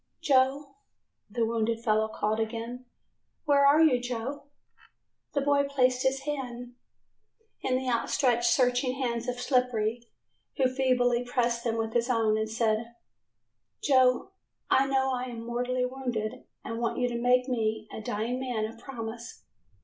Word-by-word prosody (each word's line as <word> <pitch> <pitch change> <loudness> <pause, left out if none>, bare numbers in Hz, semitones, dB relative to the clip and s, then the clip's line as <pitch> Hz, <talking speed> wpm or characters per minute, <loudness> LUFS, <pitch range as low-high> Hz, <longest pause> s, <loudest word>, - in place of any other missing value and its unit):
"Joe," 275 0 +2 0.5
the 230 +2 0
wounded 230 0 -1
fellow 215 -1 +2
called 220 0 -1
again, 230 +3 -4 0.6
"where 280 -2 +5
are 300 +3 +6
you, 255 -6 +4
Joe?" 250 +4 -4 0.9
The 285 - +1
boy 280 0 +3
placed 255 -2 +2
his 265 +1 +1
hand 250 -4 -5 0.9
in 255 - 0
the 260 0 -4
outstretched, 240 0 +1
searching 250 +1 +2
hands 240 -3 -2
of 250 0 -3
Slippery, 245 -3 0 0.5
who 260 -2 +2
feebly 250 -2 +2
pressed 240 -1 0
them 230 -1 -1
with 225 0 -2
his 240 +1 +1
own 225 -3 +2
and 220 0 -1
said, 225 +1 -1 0.9
"Joe, 260 0 +3 0.4
I 270 +1 +4
know 265 -1 +1
I 250 0 -2
am 235 -2 -7
mortally 250 +1 -1
wounded, 250 -3 -4 0.2
and 230 0 -4
want 235 - -1
you 245 - +1
to 235 -1 -3
make 250 +1 +3
me, 220 -3 -1
a - - -6
dying 220 +4 -2
man, 245 -4 -2
a 225 +1 -7
promise. 230 -1 -8
245 Hz, 150 wpm, -28 LUFS, 230-260 Hz, 0.9 s, are